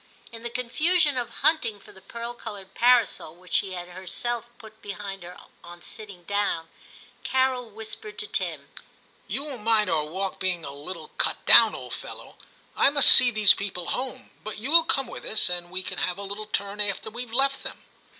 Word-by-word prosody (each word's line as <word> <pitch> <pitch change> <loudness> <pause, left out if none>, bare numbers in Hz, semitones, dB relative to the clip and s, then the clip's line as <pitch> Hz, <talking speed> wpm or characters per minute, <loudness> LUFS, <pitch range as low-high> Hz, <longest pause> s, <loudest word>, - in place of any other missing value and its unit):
In 230 0 -10
the 235 - -4
confusion 295 +6 +1
of 245 -2 -3 0.2
hunting 275 -10 +2
for - - -17
the 190 - -17
pearl 235 +3 -7
coloured 205 -5 -9
parasol, 235 -9 +2
which 180 0 -14
she 190 -2 +1
had 175 -1 -7
herself 190 +6 -4
put 220 -1 -15
behind 200 -1 -7
her 175 +1 -10 0.3
on 175 0 -13
sitting 200 -5 -8
down, 200 -4 -2 0.5
Carol 260 -2 0
whispered 220 - -8
to 445 - -3
Tim, - - -4 0.3
* - - -34
You 275 - -4
won't 275 -6 -7
mind 215 -3 +2
our 155 -2 0
walk 190 +5 -5
being 180 -4 -1
a 140 - -7
little 155 +3 -8
cut - - 0
down, - - +8
old - - -8
fellow. - - -10 0.4
I - - +5
must 285 -1 +9
see 245 - +10
these 215 -3 +6
people 185 -3 -5
home, 255 0 -5
but 215 - -6
you 240 +7 -4
will 335 0 +7
come 270 -5 +1
with - - -10
us, 215 - +2
and 175 -1 -3
we 185 +1 -4
can - - -4
have 180 0 -1
a 200 - -7
little 200 +2 -6
turn 200 0 -3
after 205 +1 -1
weVe 240 0 -7
left 270 +3 +2
them.' - - -7
215 Hz, 200 wpm, -25 LUFS, 185-245 Hz, 0.5 s, see